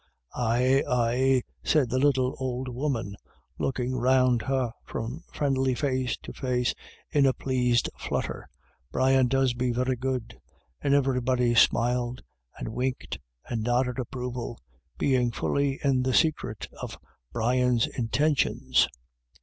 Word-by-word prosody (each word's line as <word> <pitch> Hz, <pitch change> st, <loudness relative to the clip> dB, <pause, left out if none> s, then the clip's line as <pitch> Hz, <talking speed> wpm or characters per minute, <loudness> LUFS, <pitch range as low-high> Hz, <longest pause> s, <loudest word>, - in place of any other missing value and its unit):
" -, -, -34 dB
Aye, 125 Hz, +3 st, +2 dB
aye," 125 Hz, +2 st, +2 dB, 0.2 s
said 140 Hz, -7 st, +2 dB
the 130 Hz, -, +1 dB
little 130 Hz, -2 st, +2 dB
old 130 Hz, 0 st, -3 dB
woman, 125 Hz, -5 st, -2 dB, 0.4 s
looking 130 Hz, -1 st, -1 dB
round 130 Hz, -1 st, +3 dB
her 130 Hz, -2 st, 0 dB
from 125 Hz, +8 st, -5 dB
friendly 135 Hz, -3 st, +1 dB
face 130 Hz, -2 st, -1 dB
to -, -, -8 dB
face 125 Hz, -1 st, 0 dB, 0.4 s
in 145 Hz, -3 st, +4 dB
a 130 Hz, -, +3 dB
pleased 125 Hz, -3 st, +1 dB
flutter, -, -, -3 dB, 0.2 s
" 65 Hz, +3 st, -40 dB
Brian 130 Hz, -, +3 dB
does 135 Hz, 0 st, +2 dB
be 125 Hz, +1 st, -1 dB
very 125 Hz, +2 st, 0 dB
good." 130 Hz, -2 st, -3 dB, 0.4 s
And 140 Hz, -1 st, +3 dB
every 135 Hz, -2 st, +2 dB
body 125 Hz, -1 st, +2 dB
smiled 120 Hz, +2 st, +2 dB, 0.3 s
and -, -, -5 dB
winked 125 Hz, +3 st, -3 dB, 0.3 s
and 115 Hz, -2 st, -2 dB
nodded 125 Hz, +2 st, 0 dB
approval, 125 Hz, -1 st, -4 dB, 0.4 s
being 125 Hz, -3 st, +2 dB
fully 140 Hz, +3 st, 0 dB
in 135 Hz, -2 st, +3 dB
the 130 Hz, 0 st, +1 dB
secret 145 Hz, -9 st, +1 dB
of -, -, -6 dB, 0.3 s
Brian's 125 Hz, 0 st, +2 dB
intentions. 140 Hz, +5 st, +1 dB
125 Hz, 135 wpm, -27 LUFS, 120-135 Hz, 0.4 s, in